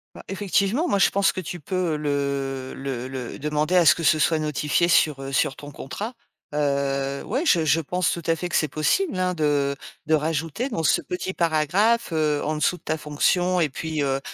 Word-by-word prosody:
Bah - - -10
effectivement, 200 - 0
moi 200 - +1
je - - +5
pense 200 0 +2
que - - -4
tu 175 0 -6
peux 175 0 -1
le 140 -2 -2
le 130 -2 -4
le 130 -2 -6
demander 150 +4 0
à 180 - +6
ce - - +6
que 165 - -4
ce 155 0 +4
soit 160 +1 +3
notifié 150 +2 +1
sur, 150 -4 +3
heu, 135 0 -6
sur 135 +1 +1
ton 145 0 -10
contrat. 205 - -6 0.4
Heu, 140 -1 -1
ouais 260 +7 -1
je 170 - +3
je 155 +1 +3
pense 180 +3 0
tout 170 - -4
à 165 - +3
fait 180 +2 -4
que - - -7
c'est 155 - +2
possible, 185 - 0
hein, 180 0 0
de 145 -3 +1 0.3
de 160 - +2
rajouter 160 - -1
dans 165 -11 -3
ce - - +3
petit 180 +1 -4
paragraphe, 175 +7 +1
heu, 150 -2 +1
en 155 - -1
dessous 155 +4 +1
de 170 - -21
ta 155 - -1
fonction 175 +4 +1
et 165 -3 +2
puis, 155 +2 -3
heu 135 0 0
155 Hz, 215 wpm, -24 LUFS, 145-180 Hz, 0.4 s, à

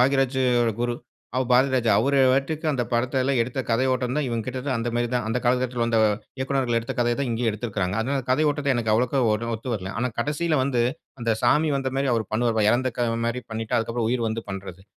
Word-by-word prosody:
பாக்யராஜியோட 130 -2 +2
குரு 120 0 0 0.4
அவ 130 - +2
பராதிராஜா 125 -2 +3
அவரு 140 +5 +2
பாட்டுக்கு 145 +4 -1
அந்த 130 -4 0
படத்துல 130 +3 +1
எடுத்த 125 +3 -5
கதையோட்டம் 130 +2 +1
தான் 150 -2 0
இவங்கிட்டருந்து 125 +3 -3
அந்த 115 +1 -2
மாரி 120 0 +1
தான். 120 -2 0
அந்த 115 +2 0
காலகட்டத்துல 125 0 +1
வந்த 115 -1 +1 0.4
இயக்குனர்கள் 130 -3 0
எடுத்த 115 - -5
கதைய 120 0 +2
தான் 140 - -1
இங்கேயே 115 0 0
எடுத்திருக்கிறாங்க. 105 -4 -3
அதனால 135 +5 -1
அந்த 130 -2 -4
கதைய 150 +4 +3
ஓட்டத்த 145 -1 -3
எனக்கு. 115 -2 0
அவ்வளோக்க 125 +4 +1
ஒண்ணு 115 +2 -2
ஒத்து 115 +4 -7
வரல. 95 -3 -5
ஆனா 125 - +1
கடைசில 150 +5 0
வந்து 130 -2 0 0.4
அந்த 115 -1 0
சாமி 150 +6 +3
வந்த 135 -1 -2
மாரி 135 -1 +1
அவர் 115 -1 0
பண்ணுவாரு 115 0 +1
பார் 105 -1 +4
இறந்தக்க 120 0 0 0.2
மாரி 120 +2 -2
பண்ணிட்டு 110 0 -3
அதுக்கப்புறம் 115 0 -1
உயிர் 120 -2 0
வந்து 110 +1 -3
பண்றது. 95 -1 -7
125 Hz, 200 wpm, -24 LUFS, 115-130 Hz, 0.4 s, பார்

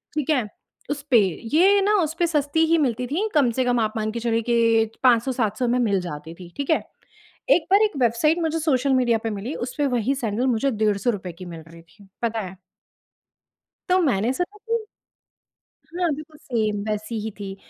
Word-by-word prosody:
ठीक 300 -1 -2
है। 260 -8 +2 0.4
उस 290 -1 -2
पे 240 - +7 0.4
ये 390 +5 +5
ना 410 +2 +2
उस 315 +1 -2
पे 345 - +4
सस्ती 300 0 0
ही 330 +1 +3
मिलती 250 -3 0
थी 355 - -1
कम 275 -5 +4
से 255 +3 0
कम 245 -1 +2
आप 215 -1 0
मान 215 0 -1
के 235 - -4
चलिए 230 -1 0
कि 230 -1 +3
500-700 240 -1 +2
में 245 +1 +1
मिल 205 -5 +2
जाती 160 -1 -7
थीं, 175 -1 -12
ठीक 280 -1 -3
है। 315 - +3 0.7
एक 330 - -1
बार 400 +2 +6
एक 425 -7 0
वेबसाइट 245 +8 +2
मुझे 325 0 0
सोशल 275 -3 +1
मीडिया 245 -3 +3
पे 225 - -1
मिली 210 +7 -5
उस - - -8
पे 290 - +2
वहीं 240 +4 +1
सैंडल 240 -1 -1
मुझे 255 +2 +1
₹150 210 -3 -1
की 180 +2 -10
मिल 165 -2 -8
रही 165 0 -14
थी, 195 +4 -21 0.2
पता 230 -1 0
है। 190 0 -8 1.3
तो 370 - +5
मैंने 235 -4 +1
सोचा 355 +8 -4
कि 455 0 -3 1.0
हाँ, 345 0 -1
बिल्कुल 305 +1 -11
सेम 220 -8 -1
वैसी 215 +2 -3
ही 220 - -4
थी। 195 -1 -6
245 Hz, 195 wpm, -23 LUFS, 215-305 Hz, 1.3 s, पे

